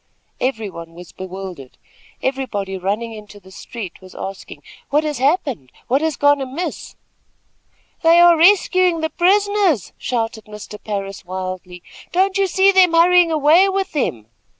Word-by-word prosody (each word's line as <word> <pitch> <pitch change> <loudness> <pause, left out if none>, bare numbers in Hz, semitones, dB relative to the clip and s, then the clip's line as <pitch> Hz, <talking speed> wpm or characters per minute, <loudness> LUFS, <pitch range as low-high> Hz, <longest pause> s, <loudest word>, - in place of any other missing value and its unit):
Everybody 215 -10 -4
was 170 +1 -13
bewildered. 185 -7 -9 0.5
Everybody 230 -8 -3
running 205 +5 -3
into 210 -1 -12
the 190 -1 -18
street 195 -2 -9
was 185 0 -15
asking: 195 0 -8 0.3
"What 300 +2 +2
has 300 -4 -3
happened? 270 - 0 0.2
What 270 +4 +2
has 320 -1 -1
gone 285 -1 +3
amiss?" 270 +7 -5 1.1
"They 330 +1 +5
are 345 0 +7
rescuing 365 -1 +3
the 320 - -2
prisoners," 395 - +1
shouted 225 -2 -3
Mr. 210 0 -10
Parris, 200 -2 -5
wildly. 185 -1 -7 0.3
"Don't 380 +2 +1
you 390 - +2
see 385 +2 +4
them 370 -3 +4
hurrying 345 0 +5
away 315 +5 +4
with 390 0 -2
them." 125 - -2
265 Hz, 140 wpm, -19 LUFS, -, 1.1 s, are